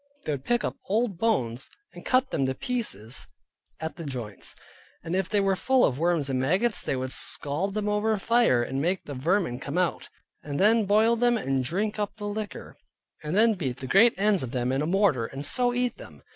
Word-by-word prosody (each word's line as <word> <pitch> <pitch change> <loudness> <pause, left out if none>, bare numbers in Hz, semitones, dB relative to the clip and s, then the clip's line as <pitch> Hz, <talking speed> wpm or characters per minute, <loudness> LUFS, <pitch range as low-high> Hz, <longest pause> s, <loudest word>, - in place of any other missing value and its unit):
They - - -1
would 135 -2 -4
pick 240 0 +1
up - - -3
old 210 -3 0
bones, 130 - 0 0.2
and - - -11
cut 255 +1 +2
them 135 - 0
to 130 - -2
pieces 130 - -3 0.5
at 160 -2 -5
the 170 - -6
joints, 120 - -4 0.5
and 165 +2 -3
if 190 -1 -1
they 210 - +2
were 195 -1 +2
full 260 +6 +3
of 130 0 -1
worms 165 -4 +1
and 130 -2 -1
maggots, 185 - +2
they - - -2
would 130 0 -3
scald 165 +12 -2
them 210 -1 -1
over 210 +1 +1
the 210 - -1
fire 210 - +3
to - - -7
make 170 +8 0
the 145 - -6
vermine 150 -1 0
come 140 +5 -4
out, 180 -2 -1 0.3
and 145 -1 -5
then 220 +2 +4
boil 215 +4 +4
them, 240 0 +2
and 135 -8 -1
drink 205 +10 -2
up 205 -1 -2
the 210 -2 -7
liquor, 205 0 -5 0.5
and 150 +4 -3
then 225 +2 +5
beat 135 - -3
the 135 - -7
great 220 - +5
ends 205 -1 +2
of 125 -2 -5
them 125 0 0
in 135 +1 0
a 150 - -1
mortar, 175 - +2
and 135 +3 -6
so 245 - +3
eat 245 0 -1
them. - - -13
185 Hz, 220 wpm, -26 LUFS, 135-215 Hz, 0.5 s, then